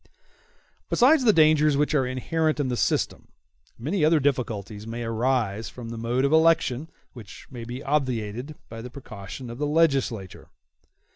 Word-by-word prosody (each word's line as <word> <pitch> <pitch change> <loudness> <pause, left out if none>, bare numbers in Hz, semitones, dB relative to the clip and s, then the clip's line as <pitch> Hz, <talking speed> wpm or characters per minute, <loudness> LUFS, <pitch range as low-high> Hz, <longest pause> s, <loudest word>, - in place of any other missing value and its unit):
Besides 265 +2 +4
the 220 - +7
dangers 155 -4 +4
which 150 +1 +1
are 135 -4 +2
inherent 155 +5 -1
in 140 -3 0
the 125 - -1
system, - - -1 0.5
many 155 - -1
other 155 +1 +4
difficulties 110 -6 -2
may 120 +1 -5
arise 115 -2 -1
from 120 -2 -9
the 115 - -6
mode 120 +4 0
of 140 - +1
election, 160 -3 +3 0.2
which 110 -6 -12
may 120 -3 -7
be 125 +4 -7
obviated 130 -2 -2
by 115 0 -8
the 125 - -8
precaution 120 -1 -9
of 120 - -9
the 150 - 0
legislator. 135 - 0
130 Hz, 155 wpm, -25 LUFS, 115-150 Hz, 0.5 s, the